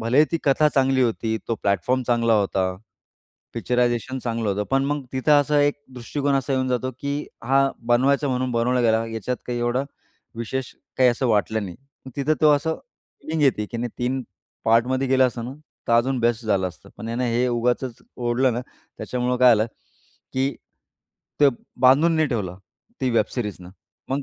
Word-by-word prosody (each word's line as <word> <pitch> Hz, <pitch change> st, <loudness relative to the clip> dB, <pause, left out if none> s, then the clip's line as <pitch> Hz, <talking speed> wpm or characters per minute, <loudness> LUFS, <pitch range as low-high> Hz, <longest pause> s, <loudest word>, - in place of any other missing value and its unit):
भलेही 125 Hz, +7 st, +4 dB
ती 165 Hz, -, +1 dB
कथा 150 Hz, +2 st, +4 dB
चांगली 135 Hz, -1 st, +3 dB
होती, 110 Hz, -1 st, 0 dB
तो 115 Hz, -, +1 dB
प्लॅटफॉर्म 105 Hz, +6 st, +1 dB
चांगला 115 Hz, -2 st, +3 dB
होता. 95 Hz, -2 st, +1 dB, 0.8 s
पिक्चरायझेशन 120 Hz, +3 st, 0 dB
चांगलं 115 Hz, -3 st, -2 dB
होतं. 100 Hz, +1 st, -1 dB
पण 135 Hz, 0 st, +2 dB
मग 145 Hz, -1 st, -2 dB
तिथं 130 Hz, +3 st, +2 dB
असा 145 Hz, +1 st, +2 dB
एक 145 Hz, 0 st, +3 dB, 0.2 s
दृष्टिकोन 140 Hz, +3 st, -1 dB
असा 135 Hz, 0 st, 0 dB
येऊन 130 Hz, -1 st, 0 dB
जातो, 125 Hz, +1 st, -1 dB
की 145 Hz, +1 st, -3 dB, 0.2 s
हा 135 Hz, +1 st, +3 dB, 0.2 s
बनवायचा 140 Hz, +3 st, +3 dB
म्हणून 130 Hz, 0 st, -1 dB
बनवल्या 120 Hz, +1 st, +1 dB
गेला, 110 Hz, 0 st, +3 dB
याच्यात 115 Hz, +2 st, -3 dB
काही 120 Hz, -1 st, -2 dB
एवढा 120 Hz, +2 st, 0 dB, 0.5 s
विशेष 125 Hz, +3 st, -4 dB, 0.3 s
काही 130 Hz, -1 st, +6 dB
असं 125 Hz, +2 st, -1 dB
वाटलं 110 Hz, 0 st, +1 dB
नाही. 90 Hz, -, -8 dB, 0.4 s
तिथं 150 Hz, +3 st, +1 dB
तो 155 Hz, -, +6 dB
असं 160 Hz, +3 st, 0 dB, 0.5 s
फीलिंग 160 Hz, -1 st, -2 dB
येते 125 Hz, -6 st, +3 dB
की 120 Hz, -, -4 dB
नाही 120 Hz, 0 st, -3 dB
3 125 Hz, +2 st, -1 dB, 0.4 s
पार्टमध्ये 125 Hz, +4 st, +2 dB
केलं 130 Hz, 0 st, +5 dB
असतं 120 Hz, -2 st, -4 dB
ना, 130 Hz, +2 st, -6 dB, 0.3 s
तर 115 Hz, -, +2 dB
अजून 125 Hz, +3 st, +3 dB
बेस्ट 120 Hz, 0 st, +1 dB
झालं 95 Hz, -3 st, +1 dB
असतं. 85 Hz, -, -16 dB
पण 115 Hz, -, -7 dB
यानं 120 Hz, +2 st, -1 dB
हे 120 Hz, +1 st, +1 dB
उगाचच 120 Hz, +1 st, -1 dB
ओढलं 125 Hz, +1 st, +1 dB
ना, 120 Hz, -, -2 dB, 0.4 s
त्याच्यामुळं 125 Hz, 0 st, -1 dB
काय 125 Hz, 0 st, +7 dB
झालं 110 Hz, +2 st, +1 dB, 0.7 s
की 135 Hz, +1 st, +1 dB, 0.9 s
ते 145 Hz, -, +7 dB, 0.3 s
बांधून 145 Hz, +6 st, +5 dB
नाही 155 Hz, -2 st, +2 dB
ठेवलं 95 Hz, -7 st, -3 dB, 0.4 s
ती 130 Hz, -, +1 dB
वेब 115 Hz, -, +3 dB
सिरीजने 105 Hz, -7 st, -4 dB, 0.4 s
मग 140 Hz, +1 st, 0 dB
125 Hz, 175 wpm, -23 LUFS, 115-135 Hz, 0.9 s, काय